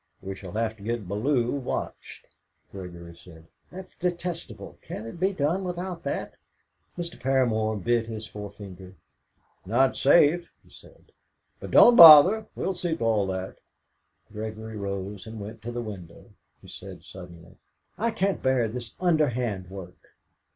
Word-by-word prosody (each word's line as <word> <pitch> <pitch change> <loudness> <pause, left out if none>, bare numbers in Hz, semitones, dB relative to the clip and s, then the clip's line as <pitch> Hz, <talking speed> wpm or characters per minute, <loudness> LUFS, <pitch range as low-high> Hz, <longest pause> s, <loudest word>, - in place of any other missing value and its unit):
We 95 0 -6
shall 95 -2 -10
have 110 0 -1
to - - -17
get 115 -3 -3
Bellew 120 +5 0
watched." 140 -3 -5 0.5
Gregory 85 -3 -10
said: 85 -1 -16 0.2
"That's 185 +1 -10
detestable. 175 -1 -5
Can't 110 - -8
it 115 +9 -9
be 190 +2 +2
done 175 +2 -1
without 180 -1 -5
that?" 140 - -4 0.6
Mr. 170 -1 -6
Paramor 120 -5 +1
bit 120 -1 +1
his 110 -1 -6
forefinger. 100 -3 -10 0.7
"Not 130 +7 +2
safe," 165 +4 +4
he - - -24
said. - - -19 0.5
"But - - -8
don't 240 - +7
bother; 170 +6 +10
we'll 190 - -2
see 175 -2 -2
to - - -4
all 110 -3 +1
that." 95 0 -5 0.7
Gregory 110 +1 -6
rose 100 0 -5
and 110 0 -8
went 105 +2 -9
to 120 +2 -6
the 120 0 -4
window. 95 -6 -10 0.3
He - - -14
said - - -11
suddenly: 85 -3 -13 0.4
"I 230 +2 0
can't 200 -3 -1
bear 130 -3 +2
this 115 0 -8
underhand 125 - 0
work." 95 -2 -12
115 Hz, 145 wpm, -26 LUFS, 100-155 Hz, 0.7 s, bother